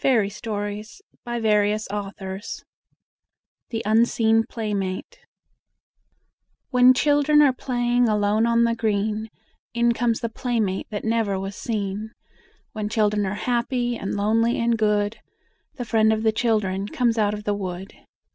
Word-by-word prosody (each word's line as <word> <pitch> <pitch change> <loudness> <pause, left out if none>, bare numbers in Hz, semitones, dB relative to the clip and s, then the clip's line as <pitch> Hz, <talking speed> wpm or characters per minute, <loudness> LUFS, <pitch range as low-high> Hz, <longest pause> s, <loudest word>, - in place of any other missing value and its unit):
ROBERT 210 -5 +1
LOUIS 210 - -5 0.3
STEVENSON 210 -3 -2 1.0
THE 225 -1 -3
UNSEEN 225 0 +3
PLAYMATE 210 - -4 1.5
When 250 0 +6
children 295 +2 +4
are 275 -3 +4
playing 245 -2 +1
alone 210 +2 +2
on 235 0 +3
the 235 0 +2
green, 220 -1 -1 0.5
In 235 0 +3
comes 235 -1 0
the 230 - -2
playmate 220 -5 -2
that 210 0 -5
never 220 -4 0
was 195 +1 -5
seen. 210 0 -4 0.6
When 215 -1 -3
children 210 -2 +1
are 195 - -3
happy 245 0 0
and 195 -3 -4
lonely 225 +3 +1
and 235 0 +2
good, 210 0 0 0.6
The 245 - -5
Friend 220 -1 +3
of 220 0 0
the 220 - +4
Children 210 -4 0
comes 235 0 0
out 210 -1 +2
of 210 - -8
the 205 - 0
wood. 190 -1 -5
220 Hz, 130 wpm, -23 LUFS, 205-235 Hz, 1.5 s, When